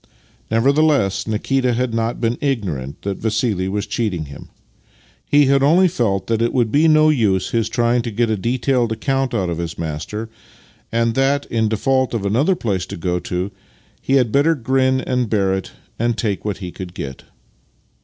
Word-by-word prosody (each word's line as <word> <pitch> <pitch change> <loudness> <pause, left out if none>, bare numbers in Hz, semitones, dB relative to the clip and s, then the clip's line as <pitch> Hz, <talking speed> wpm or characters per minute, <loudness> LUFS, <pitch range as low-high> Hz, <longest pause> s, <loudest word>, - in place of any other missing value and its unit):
Nevertheless 135 -3 +2
Nikita 125 +4 0
had 125 -1 -1
not 115 +1 -1
been 115 +4 -1
ignorant 90 - -3
that 100 -1 -3
Vassili 110 -4 0
was 105 +1 -2
cheating 95 -9 -2
him. 70 -1 -11 0.8
He 145 0 +5
had 135 0 +3
only 170 +7 +5
felt 105 - 0
that 115 +1 0
it 115 - +1
would 120 -4 +1
be 155 +5 +4
no 155 0 +5
use 105 -10 +1
his 115 -1 0
trying 120 +1 +1
to 120 - -4
get 115 +2 0
a 110 - +1
detailed 120 +2 0
account 135 +2 -1
out 95 -5 0
of 85 - -3
his 85 -1 -4
master, 85 +8 -4 0.6
and 115 0 +1
that, 135 +3 +1
in 110 -2 +1
default 130 +3 +1
of 105 -3 -2
another 135 - +2
place 100 - -2
to - - -7
go 90 +1 -1
to, 90 +3 -3 0.5
he 135 - -1
had 125 -5 +3
better 150 +6 +3
grin 130 0 +1
and 125 -3 -1
bear 100 -3 +1
it 95 -2 -4 0.3
and 120 0 0
take 105 -4 -2
what 105 -2 -2
he 90 -4 -7
could 90 -1 -8
get. 65 -2 -7
115 Hz, 185 wpm, -19 LUFS, 100-130 Hz, 0.8 s, He